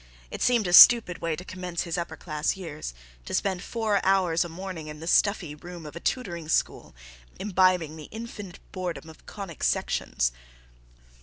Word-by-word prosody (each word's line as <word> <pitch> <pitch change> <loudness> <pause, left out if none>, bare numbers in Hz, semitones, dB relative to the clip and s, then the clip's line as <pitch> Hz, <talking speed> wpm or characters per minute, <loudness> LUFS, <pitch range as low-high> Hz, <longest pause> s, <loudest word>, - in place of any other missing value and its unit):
It - - -6
seemed 240 -4 +3
a 175 - -1
stupid 220 -3 +9
way 165 -1 -1
to 180 - -9
commence 180 -2 -4
his 170 - -3
upper 170 -1 -4
class 155 +2 -2
years, 155 - -7 0.3
to - - -3
spend 190 -2 -1
four 220 -4 -1
hours 185 -4 +3
a 175 - -7
morning 175 -2 -7
in 150 0 -8
the 160 - -8
stuffy 180 -3 +2
room 175 +2 -10
of 150 - -9
a - - -5
tutoring 170 -9 -3
school, - - -1 0.4
imbibing 185 -5 +2
the 155 - -9
infinite 215 -5 -8
boredom 175 -3 -5
of 160 - -20
conic 195 -6 -8
sections. - - 0
175 Hz, 170 wpm, -26 LUFS, 160-195 Hz, 0.4 s, stupid